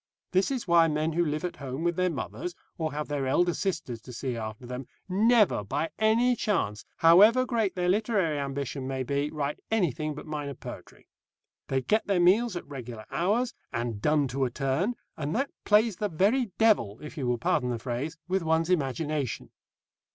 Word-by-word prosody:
This 185 +1 +2
is 260 -6 -3
why 170 -1 +6
men 155 +1 0
who 175 +2 +2
live 155 +1 -2
at 180 - -4
home 135 +2 -5
with 170 0 +1
their 185 +1 +2
mothers, 145 - -5 0.2
or 160 -2 -2
have 150 +1 -4
their 145 -2 -2
elder 175 +6 +3
sisters 160 - -3
to 125 - -11
see 125 +1 -3
after 110 +1 -6
them, 125 +1 -6 0.2
never, 210 - +4
by 145 +10 -2
any 230 +3 +4
chance, 115 - -1
however 210 +10 +7
great 225 -6 0
their 180 -1 0
literary 195 -6 +1
ambition 140 -1 -3
may 130 -1 -2
be, 140 +3 -1
write 150 -1 -3
anything 155 - 0
but 150 - -8
minor 145 -3 -4
poetry. - - -10 0.6
They 135 -1 0
get 215 - +1
their 195 -3 +2
meals 195 +5 +4
at 175 - -5
regular 120 -6 -8
hours, 215 +8 +1 0.2
and 115 -3 -3
done 150 +1 +2
to 135 +2 -1
a 130 - +1
turn, 140 - -1 0.2
and 150 0 -2
that 275 +4 0
plays 215 -1 +4
the 210 - -1
very 210 +10 +2
devil 200 - +3
if 150 0 -8
you 135 -6 -3
will 120 0 +1
pardon 125 +1 +1
the 120 - -1
phrase 130 +7 -4
with 190 +1 +1
one's 165 +1 +1
imagination. 150 -3 -1
155 Hz, 190 wpm, -28 LUFS, 135-190 Hz, 0.6 s, however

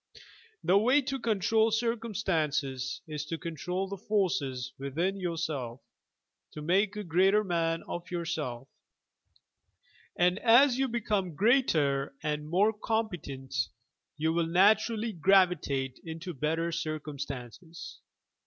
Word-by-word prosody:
The 195 +2 +4
way 255 +7 +4
to 270 +1 -3
control 220 0 +2
circumstances 190 - -1
is 150 -2 -5
to 165 +2 -4
control 180 +3 -3
the 200 0 -6
forces 155 - -1
within 165 +9 -2
yourself, 155 -9 -3 0.7
to 150 - -7
make 195 +5 +2
a 210 - -4
greater 190 +4 +3
man 165 -3 0
of 175 +1 -6
yourself, 160 -8 -3 1.5
and 180 +2 +2
as 245 +2 +5
you 270 - +2
become 210 - -1
greater 155 - +2
and 150 0 -2
more 200 +6 +3
competent, 180 - -3 0.6
you 160 +1 +1
will 170 -1 +1
naturally 215 +5 +3
gravitate 170 -7 +2
into 165 +2 -6
better 160 +4 -1
circumstances. 150 -1 -6
175 Hz, 110 wpm, -29 LUFS, 150-210 Hz, 1.5 s, as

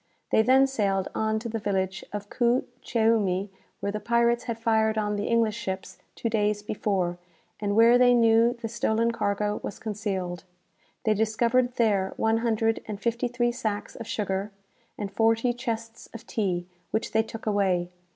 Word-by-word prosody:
They - - +5
then 260 +4 +5
sailed 200 -8 0
on 220 0 0
to 225 +2 -4
the 225 0 -3
village 190 -2 -1
of 205 0 -5
Kou 240 +3 +1 0.2
Cheoumi, 210 -4 +1 0.3
where 200 - -1
the 210 - -3
pirates 235 +2 +2
had 235 -2 -3
fired 220 -1 +2
on 210 -1 0
the 205 0 -2
English 230 -2 +2
ships 190 -4 -5 0.2
two - - -3
days 210 -2 0
before, 190 -4 -1 0.4
and 205 -1 -1
where 230 +2 +6
they 245 -1 +6
knew 230 +1 +4
the 230 - -3
stolen 230 0 +1
cargo 210 -2 -1
was - - -6
concealed. 190 -5 -4 0.6
They 215 - +3
discovered 235 +4 +1
there 200 -5 +1
one 225 0 +2
hundred 225 -1 +1
and 210 -2 -5
fifty 235 +2 0
three 240 0 0
sacks 215 -4 -4
of 225 - -8
sugar, 205 -2 -2 0.5
and 200 -2 -4
forty 225 +3 +2
chests 230 -2 -5
of 230 +1 -9
tea, 185 -7 -1 0.2
which 220 - -2
they 220 - +3
took 225 0 -8
away. 190 -4 +1
220 Hz, 170 wpm, -26 LUFS, 205-230 Hz, 0.6 s, where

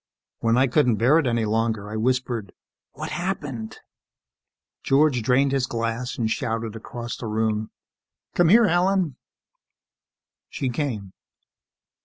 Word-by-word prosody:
When 115 +1 +2
I 130 - +5
couldn't 125 -2 +3
bear 125 +9 +4
it 145 - 0
any 115 -2 +1
longer, 110 -1 0
I - - -4
whispered, 120 -3 -1 0.4
"What - - -6
happened?" 145 - -4 1.0
George 135 -2 +3
drained 130 +4 +3
his 135 -2 +1
glass 115 +2 -3
and 115 -3 0
shouted 115 -2 -2
across 120 +1 -6
the 115 - -6
room, 110 0 -1 0.6
"Come 175 -2 +4
here, 225 +3 +7
Helen!" 175 -4 +1 1.3
She 130 - -2
came. 120 -8 -3
120 Hz, 125 wpm, -24 LUFS, 110-140 Hz, 1.3 s, here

